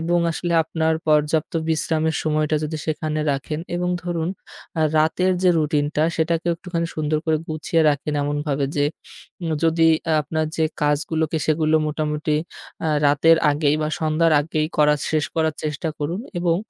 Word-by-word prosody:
এবং 170 +2 +1
আসলে 175 +1 -3
আপনার 160 0 0
পর্যাপ্ত 150 0 +2 0.2
বিশ্রামের 160 0 0
সময়টা 155 0 +1
যদি 155 +1 -3
সেখানে 155 0 -2
রাখেন 140 +3 -4 0.2
এবং 180 0 -1 0.2
ধরুন, 170 -2 -2 0.5
আ - - +2 0.2
রাতের 170 +4 +2
যে 185 - +5
routine 150 -1 +1
টা 155 - +3
সেটাকে 165 +1 0
একটুখানি 170 0 -3
সুন্দর 155 0 0
করে 160 -1 +3
গুছিয়ে 160 +1 0
রাখেন 150 +1 -1
এমনভাবে 145 -1 -1
যে, 145 - +3 0.6
উ - - -3 0.2
যদি 165 0 +4 0.3
আপনার 155 +2 -2
যে 160 - +2 0.2
কাজগুলোকে 155 +2 0
সেগুলো 155 0 +2
মোটামুটি, 150 0 -1 0.5
আ - - +1 0.2
রাতের 155 +3 +5
আগেই 145 0 +2
বা 155 - 0
সন্ধ্যার 160 +1 +2
আগেই 155 +1 -1
করাস 150 -1 +3
শেষ 155 -1 +2
করার 160 -1 +1
চেষ্টা 150 +1 -2
করুন 165 +6 -2 0.2
এবং, 170 -1 +2
155 Hz, 155 wpm, -22 LUFS, 150-165 Hz, 0.6 s, যে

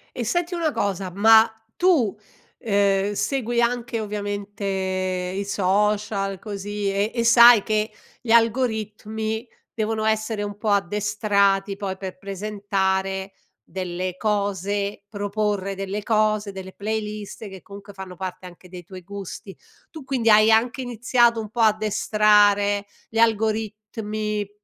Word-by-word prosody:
E 245 - -2
senti 350 - -1
una 330 -3 0
cosa, 195 -6 -2
ma 220 +3 +6 0.3
tu, 300 - +2 0.4
uhm, 200 -2 +1
segui 240 +1 -1
anche, 240 -1 -1
ovviamente, 205 -1 -5
i 185 0 -2
social, 200 0 0
così, 205 0 -4
e 200 +3 0
e 235 -1 0
sai 235 -1 +8
che 215 0 0 0.3
gli 235 - -3
algoritmi 220 -1 0 0.3
devono 220 0 -2
essere 220 -1 0
un 205 0 -6
po' 210 0 -2
addestrati, 200 0 +1
poi, 195 -2 -4
per 190 -1 -7
presentare 195 -1 -2 0.3
delle 180 +3 -4
cose, 200 -1 -1
proporre 205 -1 -2
delle 195 +2 -4
cose, 215 -1 +1
delle 190 -1 -9
playlist 210 0 -5
che, 190 -2 -10
comunque, 200 +2 -12
fanno 190 -2 -9
parte 185 0 -6
anche 180 +1 -15
dei 180 0 -10
tuoi 185 +2 -11
gusti. 200 0 -8 0.4
Tu, 315 -3 -9
quindi, 260 -4 0
hai 215 +1 +6
anche 240 +4 +2
iniziato 240 -1 +2
un 215 -1 -5
po' 235 - -2
addestrare 210 -1 +3 0.2
gli 225 - -2
algoritmi 215 -1 -1
205 Hz, 125 wpm, -23 LUFS, 195-220 Hz, 0.4 s, sai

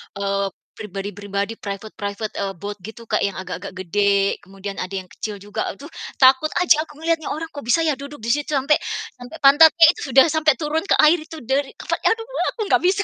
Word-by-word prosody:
eee, 200 0 -1 0.3
pribadi-pribadi, 200 +1 -5
private-private, 205 +1 -5
eee, 195 -1 -2
boat 205 +4 -7
gitu, 220 +5 -10
Kak, 215 -2 0
yang 195 - -6
agak-agak 190 0 -7
gede, 200 +2 +1
kemudian 195 +1 -8
ada 185 +1 -4
yang 185 - -24
kecil 210 -1 -5
juga, 205 0 -3
aduh, 290 +10 -8 0.2
takut 265 +3 +5 0.2
aja 315 -3 +5
aku 295 - -15
ngelihatnya, 330 -2 0
orang 325 +2 -4
kok 285 -5 -9
bisa 290 +8 +3
ya 315 - +2
duduk 280 -4 -10
di 230 - 0
situ, 295 +2 0
sampai 280 +3 +2 0.4
sampai 245 +6 -10
pantatnya 320 +4 +8
itu 270 -7 -7
udah 265 - +9
sampai 310 -2 +3
turun 315 +1 -2
ke - - +4
air 310 +2 +6
itu 315 -2 -10
dari 270 +3 -1
apa, - - -2
aduh, 450 0 +1 0.3
aku - - -27
gak - - +5
bisa. 395 +2 +2
235 Hz, 200 wpm, -21 LUFS, 200-305 Hz, 0.4 s, udah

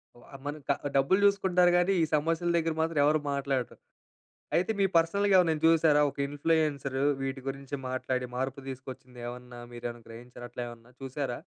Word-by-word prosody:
వ 120 - -17 0.2
మనకా 145 -1 -2 0.2
డబ్బులు 140 +9 +3
జూసుకుంటారు 185 -3 +4
గాని 180 +2 +3
ఈ - - +4
సమస్యల 165 +3 0
దగ్గర 165 -1 0
మాత్రం 160 -2 0
ఎవరు 155 +1 +3
మాట్లాడరు. 135 -3 -2 0.8
అయితే 180 +5 +1
మీ 195 - +5
పర్సనల్‌గా 200 +5 +3
ఏవరినైనా 160 -4 +2
చూశారా 160 -2 +5
ఒక - - -21
ఇన్‌ఫ్లుయెన్సర్ 145 -2 0 0.2
వీటి 135 0 -3
గురించి 135 +1 -5
మాట్లాడి 130 0 -2
మార్పు 135 +1 -3
తీసుకొచ్చింది 130 -1 -9
ఏమన్నా 125 0 -8
మీరేమన్నా 120 -1 -7
గ్రహించారా? 120 +1 -10
అట్లా 120 - -4
ఏమన్నా 120 +1 -13
చూశారా? 135 -2 -3
140 Hz, 150 wpm, -29 LUFS, 125-165 Hz, 0.8 s, మీ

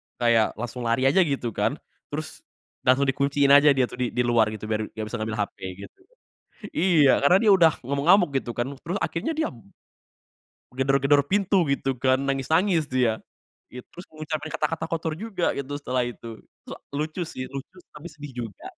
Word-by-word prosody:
kayak 115 -3 +2
langsung 120 +1 -5
lari 115 +3 +1
aja 135 +7 +4
gitu, 140 -9 0
kan. - - -1 0.3
Terus, - - -6 0.5
langsung 130 +2 +5
dikunciin 140 +1 +2
aja 145 +1 +7
dia, 130 - +3
tuh - - -11
di 125 - +1
di 125 - +2
luar, 120 -2 +3
gitu 110 - -11
biar 110 0 -1
gak 110 - -4
bisa 120 - -3
ngambil 110 0 -3
HP, - - -10 0.3
gitu. - - -13 0.7
Iya, 160 -6 +4
karena 145 +6 +5
dia 220 - +5
udah 170 -4 +6
ngamuk-ngamuk 150 +7 +3
gitu 120 - -8
kan. 120 - -1
Terus 175 +3 -4
akhirnya 165 - -2
dia 315 - 0 1.3
gedor-gedor 140 +2 +3
pintu 195 -2 +2
gitu, 135 -1 -1
kan. 130 0 +3
Nangis-nangis 160 +6 +1
dia. 125 -4 +1 0.5
It 125 0 -9
terus 175 - -11
ngucapin 155 0 -5
kata-kata 160 +1 -2
kotor 165 -1 -2
juga 200 -2 -2
gitu 140 0 -5
setelah 130 -2 -1
itu. 120 -1 -10 0.4
Sa - - -7 0.2
lucu 155 +4 -3
sih, 130 - -6
lucu, 140 +6 -8 0.2
tapi 155 +4 -9
sedih 145 -1 -10 0.2
juga. 100 - -15
140 Hz, 170 wpm, -25 LUFS, 125-165 Hz, 1.3 s, aja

